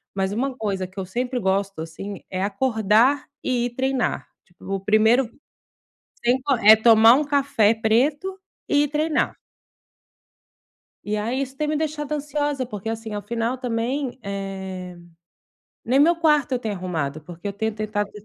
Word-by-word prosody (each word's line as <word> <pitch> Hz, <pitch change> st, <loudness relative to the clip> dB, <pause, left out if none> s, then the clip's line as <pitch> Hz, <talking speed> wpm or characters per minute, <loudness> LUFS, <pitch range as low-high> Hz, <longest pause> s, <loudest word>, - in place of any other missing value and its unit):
mas 190 Hz, 0 st, 0 dB
uma 255 Hz, +4 st, -2 dB
coisa 195 Hz, -4 st, -2 dB
que 190 Hz, +1 st, -10 dB
eu 190 Hz, -, -3 dB
sempre 245 Hz, +5 st, -2 dB
gosto, 195 Hz, -2 st, -1 dB
assim, 190 Hz, +5 st, -7 dB
é 185 Hz, 0 st, -3 dB
acordar 220 Hz, +4 st, +2 dB, 0.2 s
e 245 Hz, -2 st, 0 dB
ir 240 Hz, 0 st, -5 dB
treinar. 265 Hz, -2 st, -1 dB, 0.2 s
Tipo, 190 Hz, +2 st, -6 dB
primeiro 220 Hz, +5 st, +3 dB, 0.9 s
sem 245 Hz, +2 st, +3 dB
co 275 Hz, -1 st, +1 dB
é 220 Hz, 0 st, +8 dB
tomar 225 Hz, +1 st, +7 dB
um 300 Hz, -, +2 dB
café 275 Hz, -7 st, +3 dB
preto 280 Hz, -, 0 dB, 0.3 s
e 290 Hz, 0 st, +3 dB
ir -, -, 0 dB
treinar. 305 Hz, +1 st, 0 dB, 1.7 s
E 210 Hz, +1 st, -2 dB
aí 240 Hz, +6 st, -1 dB
isso 270 Hz, 0 st, -5 dB
tem 300 Hz, +2 st, -2 dB
me 305 Hz, -, 0 dB
deixado 305 Hz, -1 st, -3 dB
ansiosa, 290 Hz, -2 st, -2 dB
porque 215 Hz, -2 st, -6 dB
assim, 225 Hz, -1 st, -5 dB
ao 205 Hz, -, -3 dB
final 235 Hz, +2 st, -2 dB
também, 250 Hz, +2 st, -2 dB
eh, 190 Hz, -2 st, -6 dB, 0.9 s
nem 260 Hz, +3 st, +2 dB
meu 335 Hz, +3 st, +5 dB
quarto 300 Hz, -5 st, +2 dB
eu 255 Hz, -, +2 dB
tenho 220 Hz, -4 st, -3 dB
arrumado, 160 Hz, -5 st, -3 dB
porque 175 Hz, +5 st, -7 dB
eu -, -, -3 dB
tenho 220 Hz, +1 st, -2 dB
tentado 210 Hz, -1 st, -2 dB
230 Hz, 160 wpm, -23 LUFS, 200-270 Hz, 1.7 s, é